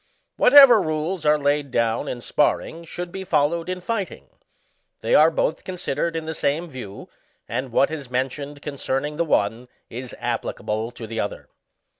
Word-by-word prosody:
Whatever 250 -5 +8
rules 155 +1 -2
are 150 0 +5
laid 145 0 0
down 115 -2 0
in 120 - -4
sparring 160 +5 0
should 175 +1 -6
b^ 190 +1 -6
followed 165 +2 +1
in 185 0 -3
fighting. 200 0 -4 0.7
They - - 0
are - - +7
both - - -1
considered 175 -2 -2
in 160 -1 -3
the 160 - -3
same 155 +3 -1
view, 125 -9 -9 0.4
and 125 +3 -3
what 135 +5 +3
is 145 -5 -6
mentioned 140 +3 -3
concerning 145 0 -3
the 170 - +2
one 115 -3 0 0.2
is 125 +2 -6
applicable 110 +2 -3
to 120 -1 -9
the 115 +1 -5
other. 100 - -4
150 Hz, 160 wpm, -23 LUFS, 125-170 Hz, 0.7 s, Whatever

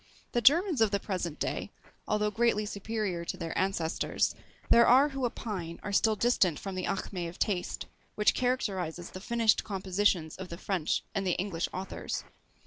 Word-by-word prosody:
The 240 - +1
Germans 320 - +5
of 220 - +5
the 200 0 0
present 180 -6 -3
day, - - -2 0.4
although 210 0 +1
greatly 220 -1 +2
superior 205 -3 -3
to - - -4
their 165 -1 -4
ancestors, 185 -4 0 0.4
there 235 0 +7
are 270 +4 +6
who 270 -3 -1
opine 185 -8 -5
are 205 - -4
still 220 +2 +4
distant 200 -8 +2
from 195 - -5
the 185 -1 -2
acmé 185 -2 -3
of 175 - -12
TASTE, 185 -5 -1 0.3
which 210 - +4
characterises 190 -9 -1
the 185 - -8
finished 230 0 +2
compositions 190 -4 0
of 190 -1 -7
the 170 - -6
French 180 -4 -1
and 195 -2 -1
the 180 - +3
English 180 -3 -2
authors. 190 +1 -4
200 Hz, 170 wpm, -30 LUFS, 180-225 Hz, 0.4 s, there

